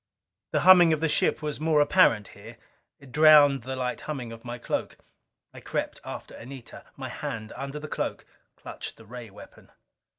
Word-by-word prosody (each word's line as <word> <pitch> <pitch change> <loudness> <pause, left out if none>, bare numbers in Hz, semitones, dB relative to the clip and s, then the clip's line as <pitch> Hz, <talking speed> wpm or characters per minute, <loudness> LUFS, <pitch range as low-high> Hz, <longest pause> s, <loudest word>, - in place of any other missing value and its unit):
The - - +1
humming 180 -3 +7
of 155 - -1
the 160 - +1
ship 155 - +1
was 150 -2 -3
more 155 -1 +2
apparent 145 - +3
here. 110 +3 -13 0.4
It 140 -3 -16
drowned 150 -2 +6
the 130 +3 -5
light 125 -1 -3
humming 130 -7 -6
of 115 0 -11
my 120 0 -6
cloak. 120 - -4 0.6
I - - -10
crept - - -4
after - - -8
Anita; 130 0 -11
my - - -6
hand 110 -1 -6
under 140 +2 -6
the 150 +1 -7
cloak - - -4 0.3
clutched - - -9
the 115 - -15
ray 120 0 -9
weapon. 100 - -15
135 Hz, 175 wpm, -26 LUFS, 115-150 Hz, 0.6 s, humming